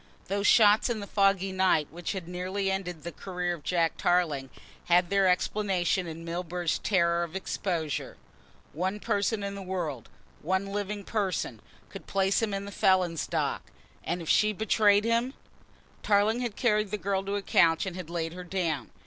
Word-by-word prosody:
Those 200 +1 0
shots 215 +1 +6
in 235 -2 -1
the 200 - -5
foggy 195 -1 +2
night 185 -5 +2
which 170 +3 -4
had 185 -4 -6
nearly 185 +2 -2
ended 180 -4 -4
the 170 - -5
career 180 +1 -3
of 170 - -8
Jack 170 -2 +1
Tarling 155 -7 +1 0.4
had 175 +1 +3
their 195 -1 +4
explanation 185 -1 +1
in 165 +1 -7
Milburgh's 175 0 -2
terror 170 -3 +2
of 170 +1 -7
exposure. 170 -5 -3 0.6
One 185 +7 -2
person 205 -1 0
in 200 0 -3
the 200 - -7
world, 175 - -4 0.3
one 190 +4 0
living 205 +1 -4
person, 200 -3 -2 0.3
could - - -10
place 195 +1 +1
him 225 -2 0
in 195 0 -3
the 200 - -7
felon's 185 -4 +2
dock, - - -1 0.4
and 170 +1 -3
if - - -10
she 215 +5 +3
betrayed 210 0 +3
him 235 +3 +1 0.7
Tarling 210 +3 +2
had 240 -4 -3
carried 215 -4 +1
the 210 - -2
girl 195 0 -1
to 200 +1 -2
a 200 - -2
couch 165 +1 +3
and 190 -2 -5
had 180 -3 -7
laid 165 -1 -3
her 180 0 -7
down. 170 -5 -2
190 Hz, 175 wpm, -28 LUFS, 175-200 Hz, 0.7 s, shots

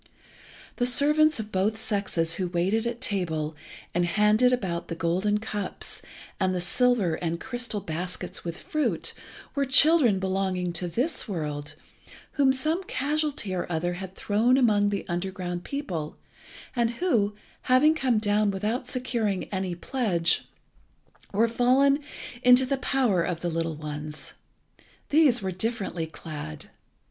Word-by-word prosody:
The 245 - +2
servants 300 +3 +4
of 215 0 -5
both 200 +3 +1
sexes 200 -7 0
who 185 +1 -2
waited 190 +6 0
at 235 +1 -4
table 165 -10 -2 0.4
and 175 - +2
handed 210 +7 +3
about 185 -9 -2
the 165 - -4
golden 180 +5 +1
cups, 210 -3 -5 0.4
and 185 -1 +1
the - - 0
silver 205 0 +2
and 170 0 -2
crystal 240 -2 -4
baskets 175 +3 -4
with 170 -1 -5
fruit, 305 +7 -2 0.4
were 280 - +1
children 270 - +5
belonging 185 -2 -1
to 175 +1 -2
this 250 - -1
world, 150 -6 -4 0.6
whom 275 -2 +3
some 310 +8 0
casualty 290 - -1
or 175 -1 -3
other 175 +2 -1
had 190 +1 -7
thrown 230 +5 +2
among 210 -5 +3
the 200 -1 -3
underground 175 0 -3
people, 180 - -4 0.6
and 235 -2 +2
who, 225 - +1 0.3
having 270 +5 +6
come 260 -7 +1
down 210 0 +2
without 215 +6 -2
securing 235 -7 -1
any 190 -2 -2
pledge, 175 -5 +1 0.9
were 220 +4 +3
fallen 260 +4 +3 0.4
into 250 0 +6
the 275 +1 0
power 255 -8 +1
of 170 -1 -2
the 175 - -1
little 165 -1 -2
ones. 150 0 -6 0.8
These 280 -7 +4
were 190 - -1
differently 190 -4 -2
clad. 150 - -8
205 Hz, 135 wpm, -26 LUFS, 175-250 Hz, 0.9 s, having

